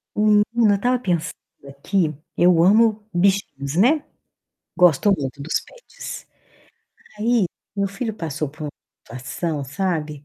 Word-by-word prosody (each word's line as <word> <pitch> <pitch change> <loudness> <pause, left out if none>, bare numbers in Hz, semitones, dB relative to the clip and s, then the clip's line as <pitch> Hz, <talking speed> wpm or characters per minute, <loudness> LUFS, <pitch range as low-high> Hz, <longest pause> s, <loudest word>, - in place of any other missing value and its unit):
Menino, 210 -1 +4 0.3
eu - - +4
estava 245 +5 +1
pensando 175 -8 -1 0.3
aqui, 155 +4 -1 0.2
eu 175 -1 +5
amo 215 +2 +4
bichinhos, 175 -7 0
né. 280 - +3 0.7
Gosto 180 +3 +4
muito 135 -2 -5
dos 155 - -1
pets. - - -10 0.9
Aí, 225 -2 +2 0.3
meu 200 0 0
filho 220 +4 -4
passou 155 -5 -4
por 150 +2 -12
uma 150 - -4 0.5
situação, 145 +3 -3
sabe, 150 -2 -3
180 Hz, 125 wpm, -22 LUFS, 150-210 Hz, 0.9 s, eu